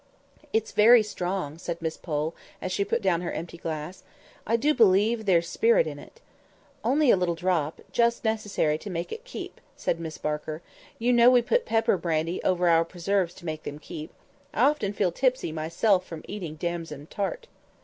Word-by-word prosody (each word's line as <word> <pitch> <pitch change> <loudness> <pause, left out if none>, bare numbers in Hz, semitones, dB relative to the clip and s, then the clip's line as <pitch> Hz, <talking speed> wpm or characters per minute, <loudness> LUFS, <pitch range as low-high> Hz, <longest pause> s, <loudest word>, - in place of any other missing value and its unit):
"It's 220 -2 0
very 225 +2 +7
strong," 180 -6 -4
said 170 -1 -4
Miss 160 -1 -3
Pole, 155 -1 -3 0.3
as 185 - -4
she 200 - +1
put 230 +2 -1
down 175 -3 +2
her 175 - -3
empty 170 +1 -6
glass; 160 +3 -5 0.5
"I 230 - +3
do 290 +6 +2
believe 220 0 +3
there's 170 -3 +3
spirit 470 - +3
in - - -6
it." 475 - -15 0.6
"Only 285 -1 +4
a - - +6
little 180 -2 0
drop—just 180 +8 0
necessary 205 -8 0
to 205 - -8
make 170 -1 -4
it 455 - -6
keep," - - -8
said 170 - -1
Miss 160 -2 -6
Barker. 150 +2 -4 0.3
"You 245 +2 +2
know 240 0 +7
we 250 -1 +5
put - - +1 0.3
brandy 165 +1 -1
pepper - - -2
over 180 -1 +2
our 165 -1 +5
preserves 180 +1 -1
to 175 - -13
make 155 -1 -4
them 145 - -6
keep. 155 +1 -8 0.4
I 230 - +3
often 280 -8 +2
feel 195 -3 0
tipsy 255 -2 0
myself 170 +5 +1
from 165 -3 -9
eating 175 -7 -6
damson 165 -3 -4
tart." 205 - -4
180 Hz, 180 wpm, -26 LUFS, 165-220 Hz, 0.6 s, very